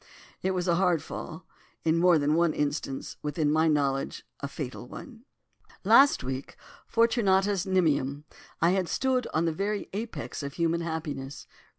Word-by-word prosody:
It 190 0 0
was 180 0 -1
a 170 -1 +3
hard 180 -5 +2
fall. - - -7 0.4
In 165 +1 +2
more 175 -1 +5
than 145 0 +1
one 170 -1 +3
instance 145 -2 -3
within 150 0 0
my 160 +1 +3
knowledge 140 -3 0
a 140 - -4
fatal 135 -3 -6
one. 235 - -11 0.6
"Last 275 - +6
week, 130 +1 -5 0.3
fortunatus 200 -4 +2
nimium, 150 -6 +1 0.4
I 170 - +5
had 185 -3 0
stood 260 -2 0
on 160 +2 +1
the 165 - 0
very 200 +4 -3
apex 220 -3 -5
of 140 -1 -5
human 170 0 0
happiness. 155 -5 -5
165 Hz, 155 wpm, -28 LUFS, 145-190 Hz, 0.6 s, Last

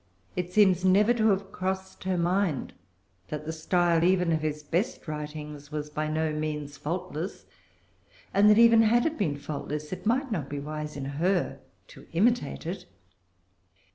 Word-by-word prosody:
It 180 0 -3
seems 190 -3 +4
never 200 +5 +5
to 225 -2 +2
have 195 -1 +1
crossed 190 0 -4
her 185 -1 0
mind 175 -3 0 0.5
that 150 0 -5
the 160 - -3
style 170 +1 +2
even 180 -1 +3
of 160 -1 +1
his 150 -1 -3
best 170 +7 -2
writings 150 -1 -6
was 150 0 -4
by 155 +1 -2
no 155 0 0
means 150 -1 -3
faultless, 165 +3 -4 0.9
and 205 +2 +6
that 210 - +6
even 230 -1 +7
had 235 +2 +4
it 320 0 0
been 155 - -1
faultless 150 +2 -5
it 185 - -6
might 260 +3 +1
not 160 -10 -2
be 145 - -4
wise 150 +1 -5
in 135 - -4
her 170 +7 0 0.3
to - - -14
imitate 235 +5 +1
it. 175 +4 -5
170 Hz, 165 wpm, -28 LUFS, 150-195 Hz, 0.9 s, even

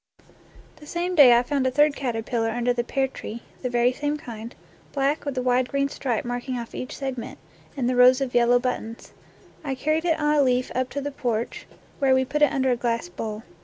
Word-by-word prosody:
The 300 - -14
same 350 +3 -2
day 265 -8 +8
I 240 - +2
found 270 0 0
a - - +3
third 295 +2 +3
caterpillar 230 -2 -2
under 240 +2 0
the 240 0 -1
pear 270 +2 0
tree, 235 -3 -8 0.2
the 250 - -2
very 245 +1 +2
same 290 +2 -2
kind, 235 -5 -9 0.4
black 280 +2 0
with 280 -2 -4
a 255 - 0
wide 250 0 +2
green 275 0 0
stripe 245 -5 -2
marking 245 +1 -3
off 235 -1 -7
each 255 +4 -6
segment, 265 -3 -5 0.4
and 250 -3 0
the 250 - +1
rows 250 +1 +6
of 270 -2 -3
yellow 240 0 +4
buttons. 245 -2 -4 0.5
I 275 -3 -2
carried 310 +5 0
it 325 -2 +1
on 300 0 +2
a 295 - +4
leaf 255 -2 +1
up 255 0 -1
to 285 - -4
the 290 +1 -4
porch, 235 -4 -3 0.3
where 270 -1 +4
wo 260 0 +2
put 300 +3 -2
it 295 - +5
under 265 -1 +1
a - - +3
glass 235 -5 -2
bowl. 215 +4 -6
255 Hz, 220 wpm, -24 LUFS, 240-280 Hz, 0.5 s, day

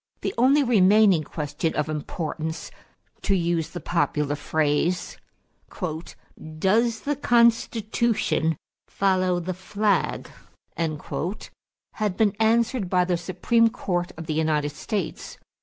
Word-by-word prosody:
The - - -2
only 270 +5 +4
remaining 205 - +5
question 150 +2 -3
of 150 - 0
importance, 155 +1 -4 0.5
to 195 - +1
use 170 -2 0
the 175 - -7
popular 150 -4 0
phrase, 155 +4 0 1.4
"Does 225 +6 +2
the 290 +1 -1
Constitution 230 - +2 0.3
follow 185 -2 +1
the 180 +2 -3
flag?" 200 +3 -1 0.5
had 180 +5 -5
been 210 -3 +2
answered 225 -2 +2
by 180 -1 +3
the 180 -1 +1
Supreme 185 +7 +2
Court 175 -4 -2
of 165 - -7
the 155 - -2
United 150 -2 0
States. 195 +5 -4
185 Hz, 110 wpm, -24 LUFS, 160-220 Hz, 1.4 s, remaining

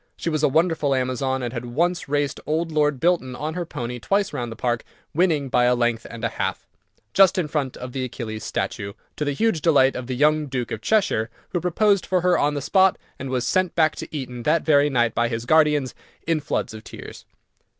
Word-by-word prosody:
She 165 - -2
was 155 -1 0
a - - +4
wonderful 160 -2 +2
Amazon, 130 +1 -1
and 120 0 -3
had 120 -1 -4
once 170 0 0
raced 145 -1 0
old 160 +2 -1
Lord 150 -3 +1
Bilton 165 -6 +1
on 155 +5 -4
her 175 -1 -4
pony 125 -3 -5
twice 200 - 0
round 120 -2 -3
the - - -6
park, 120 0 -1 0.3
winning 155 -4 +2
by 125 -1 +3
a 125 0 +4
length 120 -1 0
and 115 - -9
a - - +3
half, - - -2 0.5
just 190 -1 +5
in 175 -4 0
front 145 -4 -2
of 125 0 -7
the 130 0 -3
Achilles 115 -4 -6
statue, 100 0 -3 0.2
to - - -2
the 145 -1 -1
huge 220 0 +1
delight 140 -5 +4
of 125 -1 -5
the 130 - -3
young 150 +2 +2
Duke 125 -3 -3
of 110 - -4
Cheshire, 150 - +1 0.2
who 175 - -2
proposed 200 +3 +2
for 185 -1 +1
her 180 0 +3
on 145 +1 +1
the 145 - -2
spot, 190 +3 +4 0.2
and 135 - -5
was 125 -1 -1
sent 185 -1 +1
back 155 -2 +3
to - - -6
Eton 125 -5 -6
that 160 +7 +2
very 145 -2 +4
night 120 -4 +1
by 120 - +1
his 115 0 -4
guardians, 150 -2 +3 0.3
in 165 -1 +1
floods 145 - -2
of 110 0 -9
tears. - - -10
145 Hz, 220 wpm, -23 LUFS, 125-165 Hz, 0.5 s, just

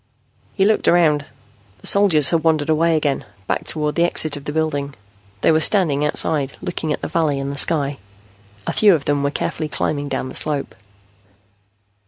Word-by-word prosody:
He 195 - +2
looked 215 +1 +2
around. 155 -4 +3 0.5
The 90 - -18
soldiers 175 -9 +4
had 165 -2 +1
wandered 160 -2 +1
away 160 +1 +2
again, 145 -3 -1 0.2
back - - -3
toward 150 -1 -2
the 170 - +1
exit 155 -3 0
of 145 0 -10
the - - -3
building. 145 -3 -2 0.5
They - - +4
were 155 - +3
standing 160 -5 +2
outside, 150 -2 +2
looking 160 -3 -4
at - - -3
the - - -2
valley 155 -4 0
and 135 0 -4
the - - -6
sky. 145 -4 +2 0.7
A - - -2
few 205 -4 +5
of 145 - -5
them 145 -1 0
were 140 - 0
carefully 155 +1 -4
climbing 145 -1 -2
down 135 -1 -3
the 130 - -9
slope. 145 -2 -3
150 Hz, 185 wpm, -19 LUFS, 145-165 Hz, 0.7 s, few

